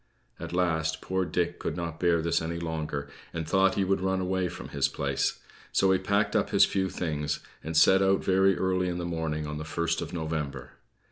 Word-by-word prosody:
At - - -6
last, 80 -3 0
poor 95 +2 -1
Dick 85 +1 -1
could 80 - -3
not 85 -2 -4
bear 85 -2 +2
this 85 0 +1
any 85 +1 -3
longer, 80 -4 -3 0.3
and 80 -2 -3
thought 95 +1 +3
he 100 - +2
would 95 0 +1
run 95 0 +1
away 95 0 0
from 90 +1 -8
his - - +1
place; - - -1 0.3
so 95 -1 +3
he 95 - +3
packed 100 +2 +1
up - - +2
his - - +6
few 95 -1 -1
things, 75 -5 -2 0.2
and 80 0 -2
set 95 +4 +6
out 95 0 +3
very 95 0 +3
early 95 -1 +1
in 90 - -3
the 90 - -3
morning 80 -2 -2
on 75 0 -4
the - - -4
first 85 +1 -1
of - - -5
November. 80 -6 -4
85 Hz, 210 wpm, -28 LUFS, 80-95 Hz, 0.3 s, his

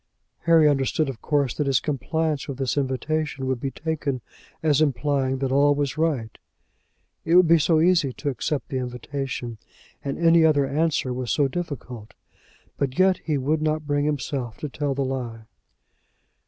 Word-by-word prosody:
Harry 165 -2 +6
understood 140 +1 +1
of 125 -5 -7
course 140 -5 +1
that 150 - -2
his 135 -3 +3
compliance 155 +1 -2
with 140 - -5
this 135 -2 -1
invitation 145 +1 -1
would 130 -2 -1
be 135 - -2
taken 150 -3 -3 0.4
as 155 -2 +3
implying 140 -2 +1
that 135 0 -2
all 145 +1 +4
was 145 -2 -1
right. 145 -9 -1 0.8
It 165 - +2
would 180 -1 +7
be 165 0 +6
so 155 +1 +3
easy 165 -4 +3
to 145 - -3
accept 140 +2 -3
the 130 - -2
invitation, 125 -1 -5 0.4
and 140 -1 -3
any 165 -1 +5
other 150 -3 +4
answer 145 -2 0
was 125 -3 -3
so 145 +4 +3
difficult! 130 -8 -6 0.6
But 135 -1 -2
yet 185 -1 +4
he 155 -3 -1
would 150 +4 0
not 155 0 0
bring 145 0 0
himself 135 -5 -3
to 150 - -3
tell 140 +1 -2
the 140 0 0
lie. 120 -4 -4
145 Hz, 170 wpm, -24 LUFS, 130-155 Hz, 0.8 s, would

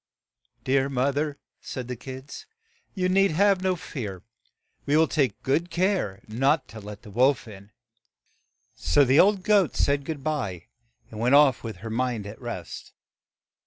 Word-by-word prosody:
"Dear 135 +1 +1
moth 135 +1 0
er," 145 -1 -1 0.2
said 130 -3 -6
the 125 - -4
kids, 130 +3 -9 0.5
"you 185 -2 0
need 195 +1 +3
have 195 +2 +3
no 185 -1 +1
fear; 115 - -7 0.6
we 145 +2 +3
will 160 0 +4
take 135 -9 -1
good 160 +6 0
care 175 - 0
not 135 +7 +1
to 110 - -9
let 105 0 -10
the 105 - -12
wolf 125 +3 +2
in." 100 -1 -12 1.0
So 85 - +3
the 135 +4 +4
old 195 -1 +4
goat 200 -5 +3
said 140 0 +1
good 145 -1 -6
by, 130 - -3 0.4
and 110 - -8
went 125 +4 +4
off 145 -3 +5
with 110 -4 -6
her 110 - -4
mind 120 -3 -1
at 105 +4 -9
rest. 115 -9 -7
135 Hz, 160 wpm, -25 LUFS, 115-155 Hz, 1.0 s, off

